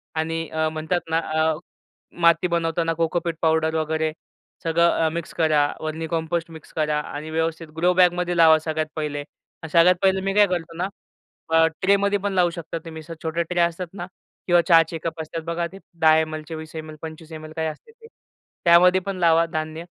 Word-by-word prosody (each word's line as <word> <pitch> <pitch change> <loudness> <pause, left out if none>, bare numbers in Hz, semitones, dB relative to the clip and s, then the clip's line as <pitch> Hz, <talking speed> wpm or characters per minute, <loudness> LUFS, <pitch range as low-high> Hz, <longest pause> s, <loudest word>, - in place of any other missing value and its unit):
आणि 165 0 -2
अ, 160 0 0
म्हणतात 160 +3 -2
ना 160 - +1
अ, 160 0 0 0.7
माती 170 +2 +4
बनवताना 165 -1 0
कोकोपीट 165 0 -1
पावडर 160 0 +2
वगैरे. 160 0 0 0.5
सगळं 170 +1 +3 0.2
अ, 160 - +2
मिक्स 170 0 -5
करा. 155 -2 +3
व्हर्मी 160 +1 -4
कंपोस्ट 165 0 -2
मिक्स 160 -1 -13
करा 150 -1 0
आणि 150 +1 -7
व्यवस्थित 160 +1 -2
ग्रो 175 +2 +3
बॅगमध्ये 180 -1 +2
लावा 160 -1 +7
सगळ्यात 155 0 -2
पहिले. 150 -2 -3 0.5
सगळ्यात 175 +2 +6
पहिले 190 -1 +3
मी 195 0 -1
काय 205 0 +6
करतो 170 -2 -4
ना 180 +2 -1 0.6
अ, 165 0 +5 0.2
ट्रेमध्ये 200 +1 +2
पण 200 0 -2
लावू 180 -2 +3
शकता 170 -1 -6
तुम्ही. 160 -1 -8
असं 165 +2 -8
छोट्या 165 +1 -1
ट्रे 175 -1 +1
असतात 170 +1 0
ना, 175 -3 -6 0.4
किंवा 175 -1 +5
चहाचे 165 -1 +4
कप 165 -1 -4
असतात 160 +1 -6
बघा, 170 +1 -2
ते 190 +3 -13 0.2
10 160 0 +6
एम-एल, 155 -1 -3
20 160 0 -9
एम-एल, 155 -1 -7
25 160 0 -9
एम-एल 155 0 -8
काय 160 0 -1
असते 155 - -8
ते. 455 0 -17 0.6
त्यामध्ये 180 +2 +6
पण 195 0 -4
लावा 165 -1 +4
धान्य 160 0 -4
165 Hz, 185 wpm, -23 LUFS, 160-175 Hz, 0.7 s, लावा